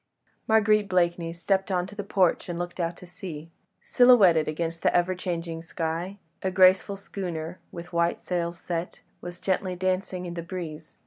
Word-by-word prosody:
Marguerite 215 -2 +4
Blakeney 170 -2 +1
stepped 190 +3 0
on 180 -2 0
to 190 - -11
the 205 0 -5
porch 185 -3 +1
and 175 - -3
looked 175 +1 -5
out 170 0 -1
to - - -12
sea. 170 -3 -8 0.3
Silhouetted 200 -11 +5
against 165 +1 -3
the - - +3
ever 175 +1 +3
changing 170 -3 -4
sky, 165 +3 -4 0.2
a 190 - 0
graceful 185 +1 +4
schooner, 175 -4 -5
with 175 0 -9
white 170 0 +1
sails 170 -1 -2
set, 170 0 -4 0.2
was 175 0 -8
gently 185 -1 -1
dancing 185 0 -1
in 175 - -5
the 170 - -4
breeze. 165 -3 -7
175 Hz, 170 wpm, -26 LUFS, 170-190 Hz, 0.3 s, Silhouetted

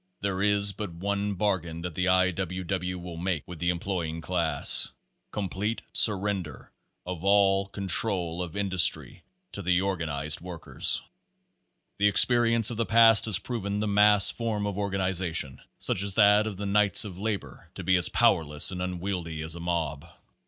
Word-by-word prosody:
There 95 -1 -3
is 100 0 +2
but 100 -1 -7
one 100 +3 -4
bargain 90 -4 -3
that 90 -2 -6
the 90 +3 -2
I. 95 0 +2
W. 95 +1 -5
W. 90 0 -4
will 90 -1 -9
make 90 -2 -4
with 90 -3 -10
the 85 +2 -1
employing 85 -2 -4
class 85 -1 +5 0.4
COMPLETE 105 +2 -4
SURRENDER 100 - 0 0.3
OF 90 -1 -7
ALL 100 -1 +2
CONTROL 95 -3 -2
OF 85 -1 -7
INDUSTRY 95 -3 +2 0.3
TO - - -7
THE 90 0 0
ORGAN 95 -4 -3
IZED 75 +1 -3
WORKERS. 85 -2 -3 1.0
The 105 - +3
experience 115 +1 +4
of 115 - -7
the 115 - -1
past 115 -2 +5
has 110 -5 +4
proven 105 -4 -5
the 105 - -2
mass 105 0 +4
form 110 -3 -4
of 100 -2 -4
organization, 95 -7 -2 0.2
such - - 0
as 100 -1 -1
that 105 0 +4
of 105 -3 -7
the 100 - -6
Knights 105 +1 +3
of 95 -3 -10
Labor, 100 - -6
to - - -8
be 95 - +1
as 90 -2 +4
powerless 75 0 +3
and 90 -1 -6
unwieldy 90 -3 -5
as 80 0 -4
a 85 - -8
mob. 85 -3 -4
95 Hz, 165 wpm, -26 LUFS, 85-100 Hz, 1.0 s, class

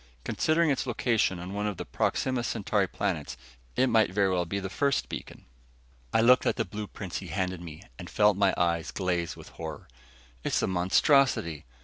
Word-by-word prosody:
Considering 160 - +2
its 135 - -1
location 115 -5 +1
on 90 +2 -7
one 105 +1 -1
of 105 -4 -3
the - - -5
Proxima 130 -2 0
Centauri 110 -4 0
planets, - - -3 0.4
it 130 - +4
might 115 -4 +3
very 95 0 +2
well 90 -1 +1
be 100 +4 -3
the 95 - -4
first 135 +10 0
beacon." - - -8 0.7
I 115 - +3
looked 125 +2 +5
at - - +2
the 115 - -1
blueprints 100 -1 -6
he 95 - -9
handed 95 -1 -2
me 85 +1 -9 0.2
and 85 -1 -8
felt 105 -1 +4
my 100 -1 +2
eyes 85 -2 +1
glaze 90 -3 -2
with - - -12
horror. 80 -2 -8 0.6
"It's - - 0
a - - +2
monstrosity! 90 - +2
100 Hz, 185 wpm, -28 LUFS, 90-115 Hz, 0.7 s, looked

